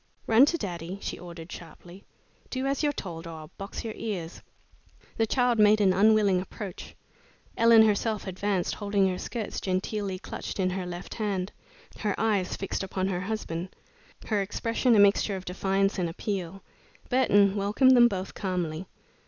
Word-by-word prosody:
"Run 235 Hz, +5 st, +6 dB
to 335 Hz, -, +1 dB
daddy," 180 Hz, -, -5 dB
she -, -, -5 dB
ordered, 170 Hz, -1 st, -10 dB
sharply. 175 Hz, +3 st, -11 dB, 0.5 s
"Do 260 Hz, 0 st, -3 dB
as 275 Hz, 0 st, 0 dB
you're 295 Hz, -1 st, +2 dB
told, 170 Hz, -, -7 dB
or 165 Hz, -, -7 dB
I'll 155 Hz, -, -12 dB
box 195 Hz, +1 st, -6 dB
your 220 Hz, -, -4 dB
ears." 180 Hz, -6 st, -5 dB, 0.8 s
The 225 Hz, -, +2 dB
child 245 Hz, -1 st, +2 dB
made 210 Hz, 0 st, +6 dB
an 195 Hz, -3 st, +4 dB
unwilling 200 Hz, -1 st, +4 dB
approach. 190 Hz, 0 st, -8 dB, 0.6 s
Ellen 230 Hz, -1 st, +7 dB
herself 215 Hz, 0 st, +1 dB
advanced, 190 Hz, -1 st, -1 dB
holding 200 Hz, -2 st, +1 dB
her 180 Hz, -, -3 dB
skirts 230 Hz, -4 st, -4 dB
genteelly 190 Hz, +1 st, -2 dB
clutched 195 Hz, -, -7 dB
in 185 Hz, -1 st, +1 dB
her 185 Hz, -1 st, -3 dB
left 175 Hz, 0 st, -7 dB
hand, 200 Hz, -3 st, -2 dB, 0.5 s
her 210 Hz, -2 st, -1 dB
eyes 205 Hz, -5 st, +1 dB
fixed 195 Hz, -, -3 dB
upon 190 Hz, 0 st, -2 dB
her 180 Hz, -2 st, -2 dB
husband, 185 Hz, -3 st, -4 dB, 0.5 s
her 210 Hz, -2 st, 0 dB
expression 230 Hz, +4 st, +1 dB
a -, -, +5 dB
mixture 200 Hz, 0 st, +4 dB
of 185 Hz, -1 st, -7 dB
defiance 195 Hz, +2 st, 0 dB
and 175 Hz, -2 st, 0 dB
appeal. 190 Hz, +1 st, -4 dB, 0.5 s
Burton 205 Hz, -6 st, +4 dB
welcomed 210 Hz, +6 st, +4 dB
them 240 Hz, -1 st, +7 dB
both 190 Hz, -4 st, -4 dB
calmly. 180 Hz, -3 st, -3 dB
195 Hz, 160 wpm, -27 LUFS, 185-215 Hz, 0.8 s, Ellen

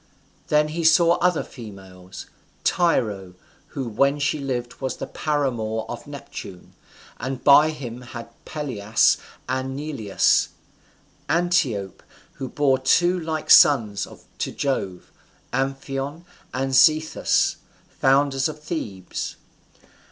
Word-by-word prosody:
Then 150 Hz, 0 st, +3 dB, 0.2 s
saw 165 Hz, +1 st, +5 dB
he 180 Hz, -, +4 dB
other 180 Hz, -3 st, 0 dB
females: 95 Hz, -6 st, -11 dB, 0.4 s
Tyro, 105 Hz, -, 0 dB, 0.3 s
who 135 Hz, -3 st, -5 dB
when 140 Hz, +6 st, +2 dB
she 145 Hz, +1 st, 0 dB
lived 125 Hz, -3 st, -4 dB
was 130 Hz, -1 st, -3 dB
the -, -, -4 dB
paramour 120 Hz, -8 st, -2 dB
of 120 Hz, +2 st, -7 dB
Neptune, 140 Hz, -10 st, -9 dB, 0.5 s
and 130 Hz, 0 st, -4 dB
by 150 Hz, +2 st, +7 dB
him 125 Hz, -6 st, -7 dB
had 120 Hz, -1 st, -8 dB, 0.2 s
Pelias 115 Hz, -8 st, +1 dB, 0.3 s
and 130 Hz, +1 st, -2 dB
Neleus. 140 Hz, -10 st, +1 dB, 0.8 s
Antiope, 160 Hz, -, 0 dB, 0.4 s
who 130 Hz, -, -3 dB
bore 135 Hz, -1 st, +2 dB
two 175 Hz, +7 st, +3 dB
like 160 Hz, -2 st, -3 dB
sons 110 Hz, -8 st, +6 dB, 0.3 s
to -, -, -2 dB
Jove, 100 Hz, -10 st, -3 dB, 0.4 s
Amphion 135 Hz, +4 st, -3 dB, 0.3 s
and 135 Hz, +1 st, -2 dB
Zethus, 155 Hz, +4 st, +3 dB, 0.3 s
founders 135 Hz, +1 st, +2 dB
of 155 Hz, -, -8 dB
Thebes. 110 Hz, -, -5 dB
135 Hz, 105 wpm, -23 LUFS, 115-150 Hz, 0.8 s, by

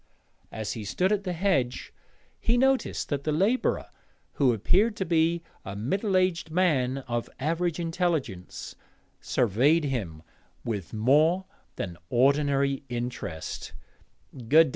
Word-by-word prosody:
As 110 Hz, -2 st, -4 dB
he 110 Hz, -, -6 dB
stood 180 Hz, -, 0 dB
at 205 Hz, -1 st, 0 dB
the 180 Hz, -, -1 dB
hedge 160 Hz, -9 st, 0 dB, 0.5 s
he 235 Hz, +1 st, +2 dB
noticed 265 Hz, +1 st, +1 dB
that 140 Hz, -2 st, -2 dB
the 155 Hz, -, 0 dB
labourer, 200 Hz, +11 st, +1 dB, 0.4 s
who 135 Hz, -3 st, +3 dB
appeared 190 Hz, -, +2 dB
to 190 Hz, -, -2 dB
be 165 Hz, 0 st, +2 dB, 0.2 s
a 95 Hz, -, -6 dB
middle 190 Hz, -, 0 dB
aged 185 Hz, -3 st, +1 dB
man 150 Hz, -7 st, +2 dB
of 120 Hz, -1 st, -2 dB
average 165 Hz, +4 st, 0 dB
intelligence, 165 Hz, -, -2 dB, 0.5 s
surveyed 130 Hz, -, +2 dB
him 100 Hz, -, -3 dB, 0.4 s
with 100 Hz, -7 st, -3 dB
more 150 Hz, -, +3 dB, 0.3 s
than 85 Hz, -3 st, -5 dB
ordinary 140 Hz, +1 st, +2 dB
interest. 120 Hz, -9 st, -5 dB
145 Hz, 120 wpm, -27 LUFS, 120-180 Hz, 0.5 s, who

